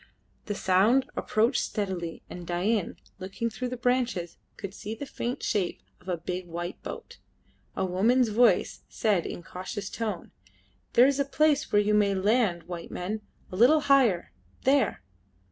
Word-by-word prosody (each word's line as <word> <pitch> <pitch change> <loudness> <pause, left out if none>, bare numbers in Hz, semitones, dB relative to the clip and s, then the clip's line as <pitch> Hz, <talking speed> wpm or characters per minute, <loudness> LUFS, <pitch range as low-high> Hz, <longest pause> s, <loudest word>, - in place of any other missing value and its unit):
The 205 - -2
sound 205 +9 +3
approached 230 +4 +1
steadily, 185 -6 -3
and 175 -1 -9
Dain, 190 +3 0 0.2
looking 195 +5 -3
through 250 +3 -4
the 250 0 -5
branches, 240 -8 0 0.2
could 195 -2 -6
see 210 +2 -6
the 285 - -6
faint 245 -2 -4
shape 190 -4 -1 0.2
of 180 - -11
a 175 - 0
big 180 +2 -5
white 175 +2 -5
boat. - - -8 0.6
A 190 - 0
woman's 225 +7 +3
voice 235 +3 +3
said 205 -7 +1
in - - -6
a - - -20
cautious 185 +4 -6
tone 225 -2 -4 0.6
"There 245 - +7
is 275 0 +2
the 280 - +2
place 295 +1 +2
where 205 0 +4
you 210 +1 +1
may 205 -2 +3
land 195 -3 +2
white 170 -1 -7
men; 210 +5 -4 0.3
a - - -5
little 260 +10 +5
higher 260 - +3 0.3
there!" 270 - +2
210 Hz, 160 wpm, -28 LUFS, 180-245 Hz, 0.6 s, There